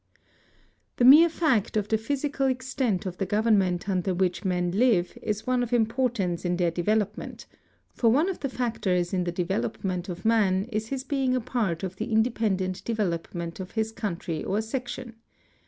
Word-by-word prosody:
The 245 Hz, -, +3 dB
mere 305 Hz, +6 st, +9 dB
fact 270 Hz, -, +1 dB
of 205 Hz, -1 st, 0 dB
the 220 Hz, -, +3 dB
physical 275 Hz, +3 st, -1 dB
extent 255 Hz, -6 st, -1 dB
of 180 Hz, -1 st, -5 dB
the 195 Hz, -, 0 dB
government 200 Hz, -4 st, +2 dB
under 185 Hz, -1 st, 0 dB
which 180 Hz, -1 st, 0 dB
men 180 Hz, -2 st, 0 dB
live 200 Hz, -4 st, +2 dB
is 210 Hz, 0 st, -3 dB
one 255 Hz, -1 st, +1 dB
of 245 Hz, -1 st, -3 dB
importance 225 Hz, -6 st, 0 dB
in 175 Hz, -1 st, 0 dB
their 175 Hz, -2 st, +1 dB
develop 205 Hz, +5 st, 0 dB
ment, -, -, -9 dB, 0.5 s
for 230 Hz, -, +2 dB
one 290 Hz, +9 st, +3 dB
of 385 Hz, -, -3 dB
the 275 Hz, -, -2 dB
factors 195 Hz, -9 st, -1 dB
in 180 Hz, -2 st, 0 dB
the 175 Hz, -, -1 dB
development 175 Hz, -, -2 dB
of 175 Hz, +2 st, -7 dB
man 200 Hz, -4 st, +3 dB
is 215 Hz, 0 st, -2 dB
his 265 Hz, +1 st, -4 dB
being 270 Hz, -2 st, 0 dB
a -, -, +2 dB
part 215 Hz, -8 st, -2 dB
of 190 Hz, 0 st, -4 dB
the 220 Hz, +3 st, -4 dB
independent 215 Hz, -5 st, 0 dB
development 170 Hz, -5 st, -3 dB
of 185 Hz, 0 st, -7 dB
his 220 Hz, 0 st, 0 dB
country 170 Hz, -7 st, -4 dB
or 200 Hz, -, 0 dB
section. 240 Hz, +1 st, -5 dB
215 Hz, 175 wpm, -26 LUFS, 180-245 Hz, 0.5 s, mere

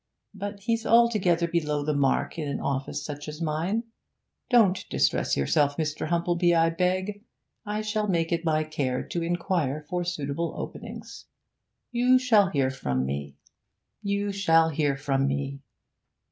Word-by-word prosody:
But 200 Hz, 0 st, -6 dB
he's 230 Hz, +2 st, 0 dB
altogether 210 Hz, -8 st, +3 dB
below 150 Hz, -4 st, -1 dB
the 150 Hz, -, +1 dB
mark 140 Hz, +3 st, +1 dB
in 150 Hz, -, -2 dB
an 140 Hz, -, -2 dB
office 135 Hz, 0 st, -3 dB
such 145 Hz, 0 st, -6 dB
as 150 Hz, 0 st, -7 dB
mine. 170 Hz, +8 st, -1 dB, 0.7 s
Don't 215 Hz, -7 st, +4 dB
distress 65 Hz, -, +1 dB
yourself, 140 Hz, -, +2 dB
Mr. 155 Hz, -1 st, -2 dB
Humplebee, 175 Hz, +1 st, +2 dB
I 165 Hz, 0 st, +4 dB
beg, 185 Hz, +4 st, -1 dB, 0.4 s
I 210 Hz, +1 st, -1 dB
shall 215 Hz, 0 st, -1 dB
make 170 Hz, -3 st, 0 dB
it 170 Hz, 0 st, 0 dB
my 155 Hz, -2 st, +2 dB
care 140 Hz, -5 st, -2 dB
to 170 Hz, -, -4 dB
inquire 165 Hz, -4 st, -1 dB
for 180 Hz, -1 st, -1 dB
suitable 165 Hz, -1 st, -3 dB
openings; -, -, -8 dB, 0.7 s
you 250 Hz, +1 st, +4 dB
shall 220 Hz, -7 st, +4 dB
hear 135 Hz, -6 st, +1 dB
from 65 Hz, -, -2 dB
me 70 Hz, +1 st, -4 dB, 0.7 s
you 200 Hz, -1 st, -1 dB
shall 165 Hz, -5 st, +3 dB
hear 145 Hz, -3 st, 0 dB
from 135 Hz, -1 st, 0 dB
me. 140 Hz, 0 st, -3 dB
165 Hz, 145 wpm, -26 LUFS, 145-195 Hz, 0.7 s, Don't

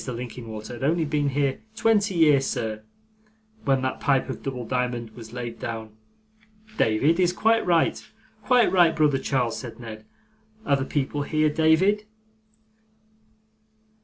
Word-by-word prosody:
Linkinwater 115 Hz, -2 st, -7 dB
had 120 Hz, -, -7 dB
only 160 Hz, +3 st, +1 dB
been 145 Hz, -1 st, 0 dB
here 140 Hz, -1 st, 0 dB, 0.2 s
twenty 210 Hz, -3 st, +2 dB
year, 150 Hz, -5 st, +5 dB
sir, 110 Hz, -5 st, -3 dB, 0.8 s
when 135 Hz, -1 st, +2 dB
that 130 Hz, -, -2 dB
pipe 135 Hz, -2 st, +1 dB
of -, -, -8 dB
double 125 Hz, -3 st, -5 dB
diamond 125 Hz, -2 st, -2 dB
was 110 Hz, -2 st, -11 dB
laid 120 Hz, -1 st, -6 dB
down.' 110 Hz, -2 st, -6 dB, 0.8 s
'David 145 Hz, -, +2 dB
is 180 Hz, -1 st, +3 dB
quite 225 Hz, +5 st, +2 dB
right, 170 Hz, -2 st, +2 dB, 0.4 s
quite 250 Hz, -3 st, +3 dB
right, 175 Hz, -3 st, +4 dB
brother 150 Hz, -4 st, +2 dB
Charles,' 120 Hz, -5 st, -1 dB
said 120 Hz, -1 st, -9 dB
Ned: 110 Hz, -2 st, -9 dB, 0.6 s
'are 140 Hz, -, +3 dB
the 135 Hz, -, -3 dB
people 145 Hz, 0 st, -2 dB
here, 155 Hz, +1 st, +1 dB
David? 170 Hz, +7 st, +3 dB
135 Hz, 135 wpm, -25 LUFS, 120-160 Hz, 0.8 s, year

